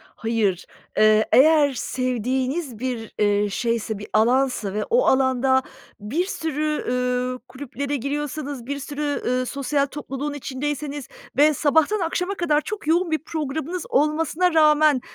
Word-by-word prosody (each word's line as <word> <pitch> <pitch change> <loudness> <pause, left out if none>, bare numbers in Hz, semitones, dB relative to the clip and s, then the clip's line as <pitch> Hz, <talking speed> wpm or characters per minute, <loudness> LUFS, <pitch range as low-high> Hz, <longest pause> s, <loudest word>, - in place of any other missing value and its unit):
Hayır, 220 -5 -1 0.3
eee, 215 0 +5
eğer 290 0 +5
sevdiğiniz 255 +2 -2
bir, 240 -3 -4
eee, 205 0 +2
şeyse, 230 0 -2
bir 205 - -8
alansa 240 -3 +2
ve 210 - -1
o - - +3
alanda 260 0 +3 0.4
bir 270 - -1
sürü, 305 -4 -2
üüü, 250 0 -1
kulüplere 280 +2 -5
giriyorsanız, 285 -1 -4
bir 280 +2 -4
sürü, 290 +1 -3
ııı, 255 +1 0
sosyal 280 +2 0
topluluğun 285 0 -5
içindeyseniz 290 0 -4 0.3
ve 300 +2 +6
sabahtan 315 +8 +2
akşama 360 +3 -1
kadar 310 -5 +1
çok 415 -5 -6
yoğun 340 +1 +2
bir 315 - +1
programınız 315 +3 -4
olmasına 320 +4 +1
rağmen 305 -3 +5
280 Hz, 130 wpm, -23 LUFS, 250-305 Hz, 0.4 s, ve